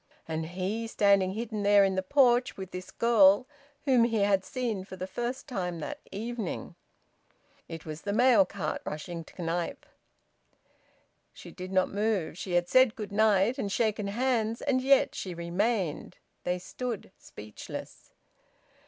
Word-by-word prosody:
And 160 0 -3
he 190 +6 -3
standing 200 -3 +3
hidden 220 -1 -4
there 205 0 +6
in 195 -1 +2
the 190 - 0
porch 250 +2 +3
with 190 -1 -7
this 185 0 -7
girl 220 -1 +5 0.4
whom 255 -4 +5
he 225 -3 0
had 195 -2 +3
seen 230 -6 -3
for 190 - -9
the 185 0 -5
first 240 +6 -4
time 180 -9 -3
that - - -5
evening!) 225 -2 -4 0.9
It 165 -1 -8
was 155 0 -7
the 205 - -3
mail 235 -1 +5
cart, 180 -4 -4
rushing 165 +2 -5
to 160 - -18
Knype. 170 +1 -3 1.5
She - - -11
did 185 0 -8
not 185 -1 +2
move. 205 -6 -1
She 180 0 -5
had 175 0 +2
said 255 0 +5
`good 210 -5 -6
night' 215 +3 +3
and 200 -5 -2
shaken 215 -1 0
hands; 230 0 0
and 265 -3 +1
yet 275 +1 +4
she 185 -3 -5
remained. 180 0 -1 0.3
They 180 0 0
stood 225 +3 -5
speechless. 105 0 -10
200 Hz, 155 wpm, -29 LUFS, 185-235 Hz, 1.5 s, there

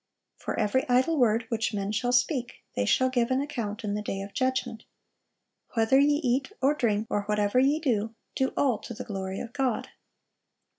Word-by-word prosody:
'For - - -4
every 240 +5 +1
idle 255 +6 +3
word 230 -4 +3
which 225 -1 -1
men 200 0 -2
shall 245 +3 0
speak, 245 0 0
they 100 - +1
shall 260 - +3
give 240 -2 +1
an 260 0 +2
account 230 -7 -4
in 205 -1 -2
the 210 - -2
day 195 -2 -4
of 195 0 -8
judgment.' 255 -3 -1 0.9
'Whether 225 +4 +4
ye 290 +1 +4
eat, 260 +7 0
or 275 +2 +3
drink, 220 -7 0
or 205 - 0
whatever 210 +2 +2
ye 280 +4 +3
do, 225 -7 -1 0.2
do 265 0 0
all 255 -6 +2
to 235 - -8
the 250 - -6
glory 190 -2 -4
of 235 - -7
God. 265 -4 -1
240 Hz, 190 wpm, -27 LUFS, 210-260 Hz, 0.9 s, Whether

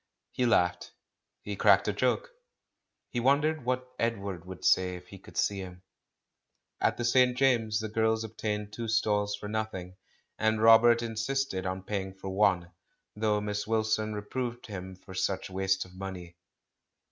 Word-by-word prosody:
He 125 - 0
laughed. 90 -6 +1 0.5
He 105 - -4
cracked 100 0 +5
a 105 - +1
joke. 130 - 0 0.8
He 120 - -1
wondered 145 +4 +2
what 130 0 -1
Edward 100 -7 -2
would 95 -1 -8
say 90 -1 +3
if 90 0 -12
he 100 - -11
could - - -14
see 100 -1 +1
him. 90 -1 -9 1.0
At - - +1
the 120 - -2
St. 125 +1 +4
James's 115 -5 +2
the 110 - -3
girls 110 +1 +1
obtained 105 -1 -4
two 115 +1 -4
stalls 105 -2 +1
for 105 0 -8
nothing, 105 -4 -4 0.4
and 110 0 +2
Robert 115 +1 +6
insisted 115 -3 -2
on 95 0 -3
paying 95 -1 -4
for 95 0 -7
one, 95 -3 +2 0.4
though 105 -1 +1
Miss 105 0 -3
Wilson 110 -1 0
reproved 120 +3 -4
him 95 -3 -7
for 95 +1 -13
such 95 0 -2
waste 95 0 0
of 90 - -16
money. 90 -2 -7
105 Hz, 160 wpm, -29 LUFS, 95-115 Hz, 1.0 s, Robert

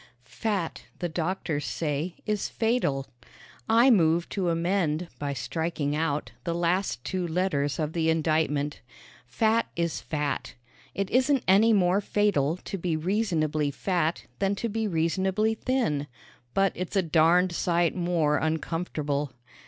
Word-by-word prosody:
Fat, 195 +2 -3
the 175 - -2
doctors 165 -2 -2
say, 155 +3 -2
is 210 -1 -1
fatal. 220 - 0 0.6
I 235 +4 +6
move 170 -5 +3
to 185 -4 -1
amend 170 -1 0
by 145 -1 -2
striking 150 +2 -2
out 150 -2 -1
the 170 -1 -2
last 175 -6 0
two 185 -2 -2
letters 160 -5 0
of 155 -1 -2
the 160 -1 +1
indictment. 155 -2 0 0.5
Fat 220 - +2
is 170 -1 -1
fat. 150 -2 -3 0.4
It 195 -1 -2
isn't 260 +2 +3
any 205 +5 +6
more 190 -1 +3
fatal 185 -8 +1
to 195 +1 -6
be 165 -2 -1
reasonably 155 -5 0
fat 170 +2 -1
than 200 0 +1
to 230 +3 -3
be 220 +1 -1
reasonably 190 +5 +1
thin, 220 - -1 0.5
but 195 -2 +3
it's 185 +3 -5
a 195 - +3
darned 170 +3 +4
sight 170 -1 +1
more 170 -4 +1
uncomfortable. 155 -3 -2
170 Hz, 135 wpm, -27 LUFS, 155-195 Hz, 0.6 s, I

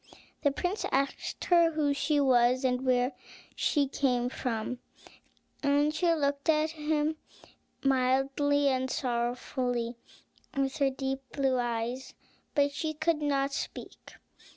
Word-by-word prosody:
The 285 - +4
prince 355 +8 -2
asked 275 0 -1
her 340 -2 +5
who 295 -2 +1
she 290 +1 +1
was, 255 -1 +4
and 250 0 +1
where 250 0 +2 0.4
she 290 -3 +1
came 250 -3 0
from, 245 -1 -3 0.8
and 290 +1 +2
she 335 +2 +2
looked 280 0 -1
at 310 0 +3
him 310 0 -1 0.7
mildly 270 +2 +2
and 260 0 0
sorrowfully 245 -1 -2 0.6
with 275 +2 0
her 280 -2 +3
deep 270 0 -3
blue 265 -2 +1
eyes; 240 +2 -3 0.4
but 285 0 +3
she 310 +2 -3
could 315 0 0
not 280 -1 0
speak. - - -7
275 Hz, 125 wpm, -29 LUFS, 255-295 Hz, 0.8 s, her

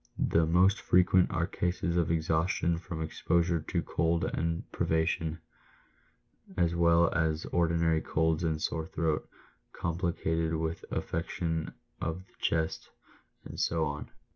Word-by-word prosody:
" - - -36 0.2
The 80 -1 +4
most 90 +5 +4
frequent 90 0 +4
are 85 - 0
cases 90 -1 -1
of 85 -2 +2
exhaustion 85 +1 +1
from 85 -3 -5
exposure 85 +1 +1
to - - -1
cold 85 0 0
and 85 +1 -1
privation, 80 0 0 1.2
as 85 -2 +2
well 85 0 +4
as 80 -2 0
ordinary 85 -2 +2
colds 80 +1 0
and 80 -2 0
sore 80 0 -2
throat, 80 -3 -1 0.4
complicated 80 -1 -1
with 80 +1 -3
affection 80 -1 -3 0.3
of 80 +3 -3
the - - -30
chest, 80 -1 -1 0.6
and - - -8
so 80 -1 +1
on. 75 0 -5
85 Hz, 130 wpm, -30 LUFS, 80-85 Hz, 1.2 s, The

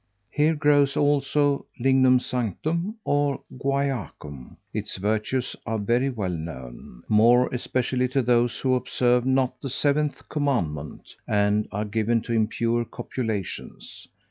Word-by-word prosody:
Here 155 +2 +2
grows, 145 -1 +3
also, 145 0 +2
lingnum 130 0 +4
sanctum, 155 - -2
or 145 -1 +1 0.2
guaiacum: 130 - -3 0.2
its - - -3
virtues 110 +6 -1
are 115 -1 -1
very 120 +6 +1
well 105 -8 -3
known, 65 -8 -8
more 120 +4 +5
especially 125 0 -1
to 130 +1 0
those 120 0 +2
who 130 -1 +2
observe 125 0 +1
not 130 -1 +1
the 135 - -4
Seventh 145 +2 0
Commandment, 90 - -2
and 105 +1 +2
are 105 +1 -2
given 110 +2 0
to 115 - -4
impure 115 +1 +1
copulations! 110 -5 -5
125 Hz, 120 wpm, -25 LUFS, 110-140 Hz, 0.2 s, more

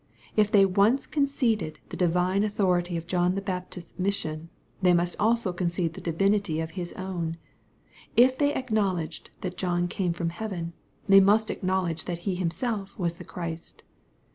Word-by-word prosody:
If 210 -1 +4
they 205 -3 +6
once 200 +8 +3
conceded 245 - 0
tb'j - - -5
divine 180 +3 +2
authority 180 -4 +1
of 165 - -5
John 180 +1 +1
the - - 0
Baptist's 180 -2 -6
mission, 165 -4 -2 0.3
they 180 -1 +5
in(7J3t 175 0 +1
also 220 -3 +2
concede 175 -2 -1
the - - -9
divinity 195 0 +1
of 160 0 -3
His 175 -1 -5
own. 175 -3 -4 0.8
If 255 +2 +6
they 290 +1 +2
acknowledged 200 -10 -1
that 180 -1 -4
John 175 -1 0
eame 175 -1 -1
from 170 0 -1
heaven, 175 -3 -5 0.3
they 195 0 +8
must 210 +3 +4
acknowledge 185 -4 -1
that 175 -1 -5
He 195 - +1
Himself 195 +3 -2
was 170 -2 -1
the - - -9
Christ. 165 -2 -7
185 Hz, 160 wpm, -27 LUFS, 170-205 Hz, 0.8 s, they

